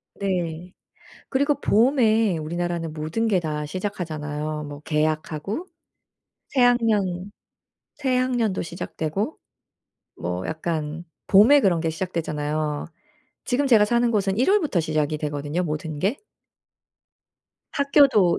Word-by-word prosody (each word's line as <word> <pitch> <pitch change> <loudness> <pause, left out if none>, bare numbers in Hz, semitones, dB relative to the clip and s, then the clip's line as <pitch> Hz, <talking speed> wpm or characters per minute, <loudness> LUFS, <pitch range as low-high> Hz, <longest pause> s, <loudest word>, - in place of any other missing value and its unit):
네. 180 -2 -3 0.6
그리고 285 +1 +2
봄에 225 - +3
우리나라는 170 0 -3
모든 160 +9 -2
게 190 -4 +2
다 150 -2 -3
시작하잖아요. 155 -5 -4
뭐 145 0 -8
개학하고 155 - -2 0.8
새 270 - 0
학년 205 -6 +2 0.7
새 265 -3 0
학년도 245 -6 0
시작되고 170 - -4 0.8
뭐 90 +1 -3
약간 160 0 -3 0.2
봄에 230 +9 +7
그런 175 -8 +2
게 165 - 0
시작되잖아요. 155 -3 -2 0.6
지금 275 +2 +1
제가 220 -4 +6
사는 240 +1 +2
곳은 195 -3 +1
1 260 +11 +3
월부터 315 - +2
시작이 155 -1 0
되거든요, 150 +3 -2
모든 155 -1 -4
게. 205 +9 0 1.5
학교도 280 - +4
175 Hz, 245 characters per minute, -24 LUFS, 155-225 Hz, 1.5 s, 봄에